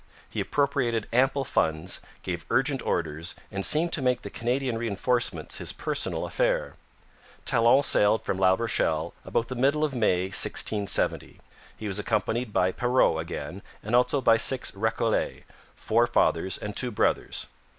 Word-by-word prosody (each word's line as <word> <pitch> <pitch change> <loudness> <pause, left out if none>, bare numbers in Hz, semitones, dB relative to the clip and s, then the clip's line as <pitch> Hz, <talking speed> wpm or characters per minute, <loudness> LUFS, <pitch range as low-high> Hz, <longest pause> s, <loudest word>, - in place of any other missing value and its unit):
He - - -5
appropriated 130 -6 0
ample 135 +3 +2
funds, 80 - 0 0.2
gave - - -4
urgent - - +1
orders, 80 +3 -3 0.2
and 100 -1 -3
seemed 165 - +2
to 150 - +1
make 125 -1 0
the - - -7
Canadian 125 +1 -1
reinforcements 120 +2 -1
his - - -1
personal - - -2
affair. - - 0 0.7
Talon 120 +2 +4
sailed 110 -4 +4
from 95 - -2
La 95 0 +4
Rochelle 85 -7 -1
about 115 - -1
the 130 - -5
middle 140 +5 +1
of 150 -3 0
May 100 -7 +1
1670. 100 +2 0 0.4
He 110 - -8
was 100 0 0
accompanied 110 +2 -1
by 95 -2 +2
Perrot 120 -8 +2
again, 80 +2 -6 0.2
and 110 +3 0
also 125 +3 +2
by 115 -2 +5
six 130 +3 +2
Recollets, 110 +2 -1 0.3
four 115 +2 +1
fathers 95 -5 +1
and 105 -1 -6
two 125 - 0
brothers. 105 - -1
115 Hz, 150 wpm, -26 LUFS, 95-130 Hz, 0.7 s, by